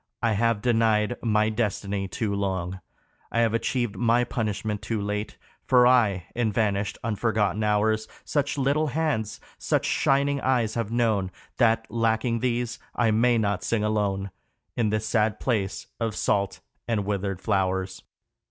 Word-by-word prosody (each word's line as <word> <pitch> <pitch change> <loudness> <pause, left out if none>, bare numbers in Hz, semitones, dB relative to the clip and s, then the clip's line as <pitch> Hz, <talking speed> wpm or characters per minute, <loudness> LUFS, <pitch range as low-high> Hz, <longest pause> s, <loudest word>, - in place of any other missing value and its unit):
I 115 - +3
have 115 0 +1
denied 115 -1 +2
my 110 -1 +2
destiny 100 -3 -2
too 100 +2 -2
long, 95 -2 -2 0.5
I 115 - +2
have 115 -1 +2
achieved 120 -1 -1
my 120 +1 +3
punishment 105 -3 -2
too 115 -2 -2
late; 105 +1 -3 0.3
For 125 -1 +5
I, 110 -8 +3
in 115 -2 0
vanished, 100 -1 0
unforgotten 110 -1 0
hours, 110 +1 +1 0.2
Such 145 -1 -1
little 140 +3 +1
hands, 145 -7 -1 0.2
such - - 0
shining 140 +1 +2
eyes, 120 -4 +1
have 115 -2 -2
known, 110 -5 +1 0.3
That, 115 -2 +3
lacking 115 +1 +1
these, 120 -1 -1 0.2
I 115 -2 +2
may 120 +2 +3
not 100 -3 0
sing 110 -2 0
alone 100 -2 -1 0.4
In 115 -3 +1
this 110 +1 -1
sad 110 -2 +1
place 105 -6 -1
of 115 -2 -2
salt 100 -2 0 0.3
and 110 -4 0
withered 100 -2 -2
flowers. 95 -2 -1
110 Hz, 145 wpm, -26 LUFS, 105-120 Hz, 0.5 s, For